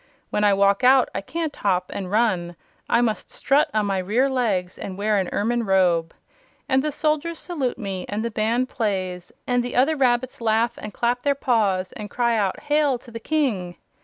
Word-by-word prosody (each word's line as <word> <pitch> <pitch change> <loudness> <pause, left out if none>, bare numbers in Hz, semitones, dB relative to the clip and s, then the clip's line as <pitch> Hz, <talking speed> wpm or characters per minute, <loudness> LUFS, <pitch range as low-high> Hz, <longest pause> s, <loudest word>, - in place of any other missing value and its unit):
When 210 - 0
I 205 - +5
walk 200 +3 +3
out 260 0 +5
I - - -2
can't 320 +8 -4
hop 185 -3 0
and 190 -2 -5
run; 190 -5 +1 0.3
I 235 - +4
must 225 -3 -1
strut 280 +3 +2
on 215 -1 +1
my 195 -1 0
rear 215 +9 +1
legs 200 -8 -1
and 190 -1 -6
wear 210 0 +1
an 185 - -2
ermine 235 +3 0
robe! 180 -5 +2 0.6
And 265 0 +2
the 305 - -1
soldiers 310 +3 -1
salute 290 -9 -3
me 195 -5 -5
and 210 +2 -2
the 235 - -2
band 230 +4 0
plays 185 -7 -3
and 245 -1 +1
the 245 - -5
other 275 +6 +3
rabbits 255 -3 +1
laugh 230 +1 +1
and 210 - -7
clap 240 +3 0
their 285 +1 +1
paws 210 -9 +1
and 210 -1 -8
cry 235 0 +1
out: 200 -4 -1
'Hail 295 -3 +2
to 240 0 -16
the 230 - -6
King!' 230 - -1
225 Hz, 195 wpm, -23 LUFS, 195-255 Hz, 0.6 s, I